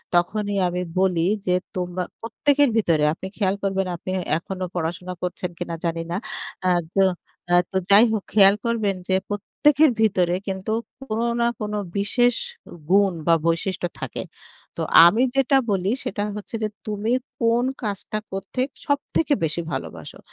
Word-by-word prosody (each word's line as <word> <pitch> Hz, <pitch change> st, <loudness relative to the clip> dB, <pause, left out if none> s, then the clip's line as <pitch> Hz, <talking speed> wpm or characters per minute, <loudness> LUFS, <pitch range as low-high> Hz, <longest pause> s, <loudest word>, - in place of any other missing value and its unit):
তখনই 205 Hz, +4 st, +1 dB
আমি 180 Hz, +1 st, -2 dB, 0.2 s
বলি 180 Hz, -3 st, +2 dB, 0.2 s
যে, 180 Hz, 0 st, +2 dB, 0.2 s
তোমা 180 Hz, 0 st, -2 dB, 0.2 s
প্রত্যেকের 285 Hz, +5 st, +2 dB
ভিতরে 165 Hz, -8 st, +2 dB
আপনি 190 Hz, -, -7 dB
খেয়াল 195 Hz, -2 st, +1 dB
করবেন 195 Hz, -1 st, 0 dB
আপনি 175 Hz, -, -8 dB
এ -, -, -3 dB, 0.2 s
এখনো 185 Hz, +2 st, -5 dB
পড়াশোনা 175 Hz, +2 st, -3 dB
করছেন 180 Hz, 0 st, -3 dB
কিনা 170 Hz, -1 st, -4 dB
জানি 165 Hz, 0 st, -1 dB
না। 175 Hz, -, -1 dB, 0.5 s
আ -, -, +4 dB, 0.3 s
তো 195 Hz, -, +5 dB, 0.5 s
আ -, -, +7 dB, 0.2 s
তো 190 Hz, -, 0 dB
যাই 205 Hz, +3 st, +9 dB
হোক 215 Hz, -3 st, -1 dB
খেয়াল 200 Hz, -1 st, +7 dB
করবেন 220 Hz, -4 st, 0 dB
যে, 190 Hz, -, +2 dB
প্রত্যেকের 285 Hz, +8 st, +3 dB
ভিতরে 180 Hz, -5 st, +2 dB
কিন্তু 190 Hz, +2 st, -3 dB, 0.3 s
কোনো 230 Hz, -2 st, -2 dB
না 235 Hz, -, +3 dB
কোনো 210 Hz, 0 st, -2 dB, 0.2 s
বিশেষ 245 Hz, +4 st, +2 dB, 0.4 s
উ -, -, -9 dB, 0.2 s
গুণ 195 Hz, 0 st, +4 dB
বা 165 Hz, -, +6 dB
বৈশিষ্ট্য 175 Hz, +2 st, 0 dB
থাকে। -, -, -4 dB, 0.5 s
তো -, -, -2 dB, 0.2 s
আমি 215 Hz, +9 st, +5 dB
যেটা 270 Hz, 0 st, +4 dB
বলি 195 Hz, 0 st, +1 dB
সেটা 205 Hz, -, -3 dB
হচ্ছে 210 Hz, +2 st, -7 dB
যে, 215 Hz, -, 0 dB, 0.2 s
"তুমি 210 Hz, +2 st, -2 dB, 0.3 s
কোন 230 Hz, +1 st, +3 dB, 0.2 s
কাজটা 210 Hz, 0 st, -3 dB
করতে 195 Hz, +6 st, -4 dB, 0.2 s
সবথেকে 285 Hz, +2 st, 0 dB
বেশি 160 Hz, +2 st, 0 dB
ভালোবাসো? 85 Hz, -, -6 dB
195 Hz, 155 wpm, -23 LUFS, 180-220 Hz, 0.5 s, যাই